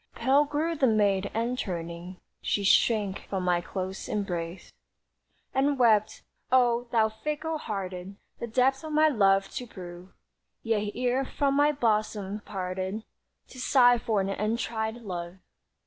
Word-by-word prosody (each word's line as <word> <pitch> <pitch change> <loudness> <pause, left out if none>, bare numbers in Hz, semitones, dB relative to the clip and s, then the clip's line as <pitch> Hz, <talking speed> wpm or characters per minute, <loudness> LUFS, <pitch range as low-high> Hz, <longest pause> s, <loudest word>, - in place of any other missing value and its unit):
Pale 270 +5 +3
grew 300 +3 -1
the 280 -5 +2
maid, 200 -3 +2
and, 235 +3 -1
turning, 170 0 -5 0.2
She 205 - 0
shrank 200 -1 +2
from 190 -2 -2
my 175 -1 +2
close 190 +1 -5
embrace, 175 -4 -4 0.8
And 275 +1 +2
wept: 220 -4 +3 0.3
"Oh! 245 -1 +3
thou 225 -2 +4
fickle 300 +8 -4
hearted 190 -4 -5 0.2
The 235 - -4
depth 260 +4 +2
of 310 -1 -5
my 310 +1 +5
love 195 -6 +3
to 250 -2 -5
prove, 180 -3 -10 0.5
Yet 210 -2 0
ere 250 +2 +1
from 275 +1 0
my 290 +1 +4
bosom 215 -6 -1
parted 190 +1 -4 0.5
To 255 - -11
sigh 245 -2 +5
for 220 -3 0
an 190 - -2
untried 220 +2 -2
love. 180 -6 -6
220 Hz, 140 wpm, -28 LUFS, 190-250 Hz, 0.8 s, my